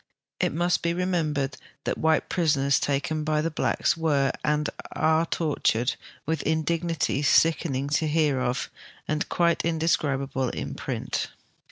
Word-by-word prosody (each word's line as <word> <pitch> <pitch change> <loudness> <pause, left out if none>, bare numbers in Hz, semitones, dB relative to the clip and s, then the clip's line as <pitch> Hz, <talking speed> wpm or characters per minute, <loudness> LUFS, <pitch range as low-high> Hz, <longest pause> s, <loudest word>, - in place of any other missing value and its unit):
It - - +1
must 175 +3 +1
ho 170 0 +1
retnomhered 155 -7 -1 0.3
that - - -1
white 160 0 +2
prisoners 145 -5 +2
taken 150 +2 -1
by 155 0 +1
the 165 - -1
blacks 155 - +1
were 145 -5 +2
and 150 0 +1 0.3
aro 160 +1 +2
tortured 140 -6 +1 0.3
with 160 +1 -1
indignities 160 -2 0
sickening 140 -4 +3
to 155 +2 +1
hear 150 -3 +2
of 130 +2 -2 0.4
and 155 0 -1
quite 170 -1 +2
indescribable 140 -5 0
in - - -5
prittt. - - -3
155 Hz, 135 wpm, -26 LUFS, 140-165 Hz, 0.4 s, sickening